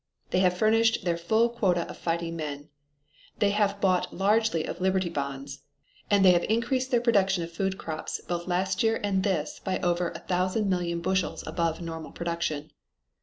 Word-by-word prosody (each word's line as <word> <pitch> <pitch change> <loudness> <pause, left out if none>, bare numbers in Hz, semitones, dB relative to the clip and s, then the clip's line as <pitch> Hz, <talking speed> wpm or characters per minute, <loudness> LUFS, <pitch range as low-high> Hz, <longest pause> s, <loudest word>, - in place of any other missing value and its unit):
They 180 - +2
have 180 -1 +3
furnished 225 0 +3
their 170 -1 +2
full 220 +8 +2
quota 190 -8 0
of - - -8
fighting 170 0 -2
men; 150 -2 -5 0.7
they 200 -1 +3
have 205 -1 +1
bought 185 -2 +2
largely 205 -3 +2
of 175 - -6
Liberty 190 -1 +1
Bonds; 140 -2 -5 0.5
and 200 -2 +4
they 185 - +9
have 175 -1 +3
increased 245 +4 0
their 245 -3 +3
production 195 -6 +2
of 165 - -7
food 190 +3 -2
crops 155 -1 -5
both 175 +1 -3
last 185 +1 0
year 225 0 +2
and 195 -2 +1
this 185 -7 -1
by 190 - -1
over 175 -1 +1
a - - -7
thousand 185 +4 0
million 170 -2 -1
bushels 190 +1 -1
above 165 -1 -1
normal 165 -2 -6
production. 170 -3 -3
180 Hz, 175 wpm, -27 LUFS, 170-200 Hz, 0.7 s, they